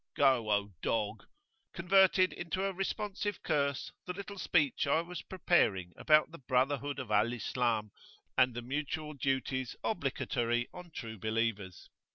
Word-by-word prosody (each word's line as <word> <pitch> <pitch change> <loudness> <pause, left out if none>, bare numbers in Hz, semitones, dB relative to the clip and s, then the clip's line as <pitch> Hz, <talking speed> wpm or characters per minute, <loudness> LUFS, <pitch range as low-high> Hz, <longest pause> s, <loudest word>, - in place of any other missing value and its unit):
"Go, 130 -6 +3
O 100 0 +1
dog!" 110 -1 -1 0.5
converted 185 +1 +4
into 175 +2 -3
a 195 - -1
responsive 205 +1 -3
curse 140 -2 0 0.2
the 180 - -2
little 200 +1 -7
speech 150 -6 +2
I 155 +3 +3
was 175 0 -7
preparing 100 - +1
about 155 0 +4
[p.21]the 150 -6 -13
brotherhood 140 +2 +1
of 130 -5 -6
Al 105 +3 +3
Islam 115 -3 -1 0.4
and 130 -2 +4
the 120 - -4
mutual 150 +4 -3
duties 130 -2 -1
obligatory 120 - -1
on 180 -1 -10
true 115 -8 -7
believers. 110 -4 -2
135 Hz, 140 wpm, -32 LUFS, 115-175 Hz, 0.5 s, converted